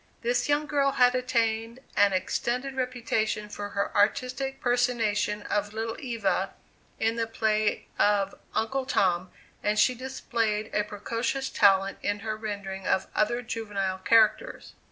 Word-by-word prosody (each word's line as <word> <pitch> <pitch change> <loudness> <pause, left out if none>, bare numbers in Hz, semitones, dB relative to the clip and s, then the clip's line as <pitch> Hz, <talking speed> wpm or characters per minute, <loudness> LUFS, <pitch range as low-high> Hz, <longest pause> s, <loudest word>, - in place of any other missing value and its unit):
This 245 +4 +1
young 295 +1 +2
girl 280 -2 +1
had 250 0 +5
attained 230 -2 0 0.2
an 205 0 +5
extended 245 +8 -1
reputation 230 -4 -1
for 205 0 -6
her 200 - -1
artistic 255 +6 +1
personation 225 -4 +1
of 205 0 -1
"Little 225 +1 -3
Eva," 230 -7 -1 0.4
in 225 +1 +1
the 230 -1 0
play 215 -1 0
of 200 -1 +3 0.2
"Uncle 260 +4 -1
Tom," 185 -7 +1 0.3
and 210 +1 0
she 255 - +5
displayed 230 -4 -2
a 210 - +2
precocious 230 +6 -3
talent 195 -2 +4
in 205 0 -1
her 220 0 -3
rendering 200 -3 -5
of 190 - +2
other 240 +3 +1
juvenile 205 -5 -3
characters. 225 0 +2
225 Hz, 135 wpm, -27 LUFS, 205-245 Hz, 0.4 s, had